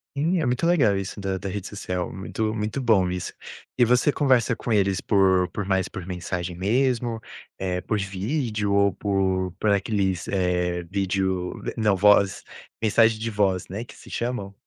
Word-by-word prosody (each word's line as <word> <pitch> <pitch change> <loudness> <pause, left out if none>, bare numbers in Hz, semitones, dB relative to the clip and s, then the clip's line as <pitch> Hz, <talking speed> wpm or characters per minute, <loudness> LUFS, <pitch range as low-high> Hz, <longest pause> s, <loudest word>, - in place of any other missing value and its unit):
Sim, 165 +5 +1
é 150 - 0
muito 125 +7 +1
legal 130 - +4
isso 95 +2 -4
da 95 -1 -2
da 100 - -5
rede 95 0 -5
social, 90 -3 -4
muito 110 +3 -3
muito 105 +4 -2
bom 105 -8 +3
isso. 90 0 -4 0.4
E 125 - +4
você 125 +5 +3
conversa 130 -5 +2
com 120 - -5
eles 100 -3 +2
por 95 -3 +3
por 100 +2 -4
mais 95 -2 +1
por 90 - -7
mensagem 90 -1 -4
mesmo? 115 +4 0 0.4
Eh, 90 -1 -2
por 105 +3 -1
vídeo? 105 +2 -2
Ou 100 -1 +3
por 95 -2 0
por 105 - +2
aqueles, 95 -3 0
eh, 90 -2 0
vídeo 95 0 -1 0.2
não, 105 -4 +2
voz, 100 0 +4 0.4
mensagem 115 0 +3
de 115 +1 -3
voz, 95 -3 +1
né, 100 +5 -5
que 120 - -14
se - - -14
chamam. 115 -5 -3
100 Hz, 170 wpm, -24 LUFS, 95-115 Hz, 0.4 s, legal